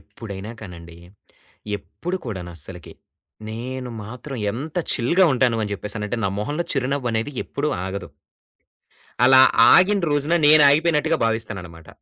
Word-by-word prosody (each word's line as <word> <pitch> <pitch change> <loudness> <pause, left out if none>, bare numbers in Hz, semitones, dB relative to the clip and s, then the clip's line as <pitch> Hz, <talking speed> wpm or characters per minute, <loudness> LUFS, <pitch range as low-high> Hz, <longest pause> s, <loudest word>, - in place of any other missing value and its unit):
ఎప్పుడైనా 100 -2 -9
కానండి, 85 -4 -11 0.8
ఎప్పుడు 175 - -6
కూడాను 95 -7 -6
అస్సలకి 85 +2 -11 0.6
నేను 125 +3 -6
మాత్రం 125 +5 -8 0.2
ఎంత 145 - -6 0.2
చిల్‌గా 170 +10 +2
ఉంటాను 125 -2 +2
అని 105 - -5
చెప్పేసనంటే, 105 +3 -4
నా - - +2
మొహంలో 145 +11 -2
చిరునవ్వనేది 125 -3 -2
ఎప్పుడూ 145 +2 -3 0.2
ఆగదు. 95 0 -5 1.2
అలా 130 +1 +7 0.3
ఆగిన 195 +3 +5
రోజున 145 +3 +1
నేనాగిపోయినట్టుగా 155 +2 +4
భావిస్తాననమాట. 95 -7 -4
120 Hz, 110 wpm, -22 LUFS, 100-145 Hz, 1.2 s, అలా